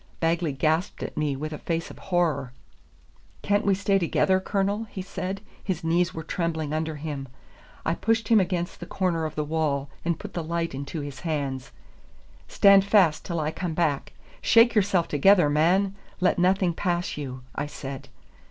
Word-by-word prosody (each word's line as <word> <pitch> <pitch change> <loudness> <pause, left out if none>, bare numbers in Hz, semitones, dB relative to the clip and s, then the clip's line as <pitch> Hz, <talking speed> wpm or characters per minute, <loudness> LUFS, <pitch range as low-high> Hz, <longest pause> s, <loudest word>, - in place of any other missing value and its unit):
Bagley 165 -1 +1
gasped 160 +7 0
at - - -6
me 150 -2 0
with 155 +3 -5
a 150 - -6
face 165 -1 -3
of - - -13
horror. 155 -8 0 0.9
"Can't 205 +1 +2
we 195 - +4
stay 200 0 +2
together, 185 +2 +2
Colonel?" 200 +3 -1
he 190 - -6
said; 190 +1 -4 0.2
his 185 -5 -3
knees 170 +2 +2
were 160 - -6
trembling 160 -2 -2
under 160 0 -2
him. 145 -2 -5 0.6
I 165 - +2
pushed 225 +3 0
him 225 -2 +6
against 175 -2 -1
the - - -8
corner 175 -4 0
of 155 - -5
the 150 - 0
wall, 145 -3 -1
and 170 -1 0
put 205 +2 -9
the 170 - -3
light 170 0 -2
into 140 +3 -5
his 140 -3 -7
hands. 140 -5 -3 0.8
"Stand 200 -1 +6
fast 195 -6 +3
till 170 -2 -3
I 155 0 -1
come 170 -1 -4
back; 150 -5 0 0.3
shake 230 0 +6
yourself 195 -5 +2
together, 165 +1 +4
man; 180 +6 +3 0.3
let 180 -1 +2
nothing 185 0 +3
pass 175 0 -1
you," 130 -3 -6
I 145 - -3
said. 135 -2 -7
170 Hz, 175 wpm, -26 LUFS, 150-190 Hz, 0.9 s, him